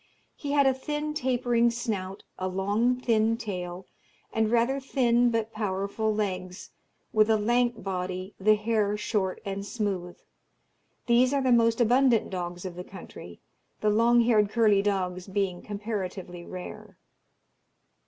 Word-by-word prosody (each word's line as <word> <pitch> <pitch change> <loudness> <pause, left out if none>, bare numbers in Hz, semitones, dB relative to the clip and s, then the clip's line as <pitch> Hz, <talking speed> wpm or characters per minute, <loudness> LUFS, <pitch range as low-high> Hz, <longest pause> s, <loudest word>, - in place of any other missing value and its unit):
He 285 -1 -4
had 285 -1 +4
a 265 - +4
thin 295 +3 -3
tapering 245 -4 +2
snout, 210 -5 -4 0.2
a 185 - -1
long 205 +7 +1
thin 225 -2 +2
tail, 180 -5 -5 0.5
and 220 -1 +1
rather 240 +4 +2
thin 245 -3 +2
but 225 -1 -2
powerful 205 +1 -1
legs, 185 -3 -4 0.4
with 215 0 +4
a 220 - +4
lank 240 +1 +1
body, 185 0 -4
the 215 +2 +5
hair 210 -1 0
short 205 -3 -1
and 195 0 -4
smooth. 200 -5 -3 0.9
These 250 +3 +4
are 275 - +1
the 255 - +2
most 230 -1 +4
abundant 245 -1 +3
dogs 175 -1 -5
of 185 - -5
the 180 +1 -7
country, 170 - -11 0.4
the 215 - +3
long 235 +3 +4
haired 220 -3 +3
curly 215 -3 +3
dogs 185 -2 -2
being 190 -2 -2
comparatively 195 -4 -5
rare. 180 -1 -9
215 Hz, 140 wpm, -27 LUFS, 190-235 Hz, 0.9 s, the